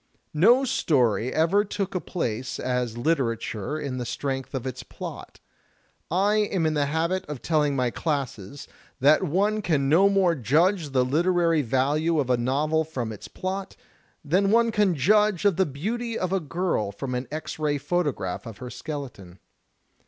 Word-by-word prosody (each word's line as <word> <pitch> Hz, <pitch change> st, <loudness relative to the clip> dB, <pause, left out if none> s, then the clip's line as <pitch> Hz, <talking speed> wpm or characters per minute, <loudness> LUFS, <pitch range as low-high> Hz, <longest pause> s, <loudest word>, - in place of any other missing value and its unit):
No 235 Hz, -, +5 dB
story 125 Hz, -, +1 dB
ever 170 Hz, +6 st, +3 dB
took 200 Hz, -2 st, -4 dB
a 185 Hz, -, 0 dB
place 125 Hz, -, -3 dB
as 125 Hz, -2 st, -2 dB
litera 125 Hz, -4 st, +1 dB
ture 115 Hz, +7 st, -4 dB
on 130 Hz, -2 st, -3 dB
the -, -, -2 dB
strength 135 Hz, 0 st, -3 dB
of 130 Hz, -1 st, -4 dB
its 130 Hz, -, -5 dB
plot. -, -, -9 dB, 0.7 s
I 200 Hz, +5 st, +2 dB
am 200 Hz, -5 st, +1 dB
in 155 Hz, -, +1 dB
the 145 Hz, -2 st, +1 dB
habit 165 Hz, +5 st, 0 dB
of 150 Hz, -4 st, -7 dB
telling 150 Hz, -3 st, +1 dB
my 125 Hz, -2 st, 0 dB
classes 140 Hz, -, -4 dB, 0.3 s
that 145 Hz, +4 st, +5 dB
one 200 Hz, +5 st, +1 dB
can 145 Hz, -8 st, +1 dB
no 185 Hz, +7 st, +5 dB
more 195 Hz, -3 st, +3 dB
judge 160 Hz, -, +2 dB
the 130 Hz, -2 st, +2 dB
literary 165 Hz, +3 st, +2 dB
value 145 Hz, +6 st, +1 dB
of 130 Hz, -3 st, 0 dB
a -, -, +5 dB
novel 150 Hz, +6 st, +1 dB
from 130 Hz, -8 st, -4 dB
its 105 Hz, -, -9 dB
plot, 190 Hz, +1 st, -5 dB, 0.5 s
than 185 Hz, +7 st, +2 dB
one 230 Hz, +2 st, +4 dB
can 205 Hz, -5 st, +2 dB
judge 210 Hz, +5 st, +3 dB
of 195 Hz, -4 st, +3 dB
the 190 Hz, -, +3 dB
beauty 225 Hz, -, -3 dB
of 185 Hz, 0 st, -2 dB
a 195 Hz, -, +2 dB
girl 165 Hz, -, -1 dB
from 125 Hz, +5 st, -5 dB
an 125 Hz, +1 st, -3 dB
X 155 Hz, +1 st, -5 dB
ray 150 Hz, -1 st, +1 dB
photograph 145 Hz, -, -2 dB
of 110 Hz, -3 st, -9 dB
her 125 Hz, -1 st, -8 dB
skeleton. 125 Hz, -, -7 dB
155 Hz, 170 wpm, -25 LUFS, 130-185 Hz, 0.7 s, No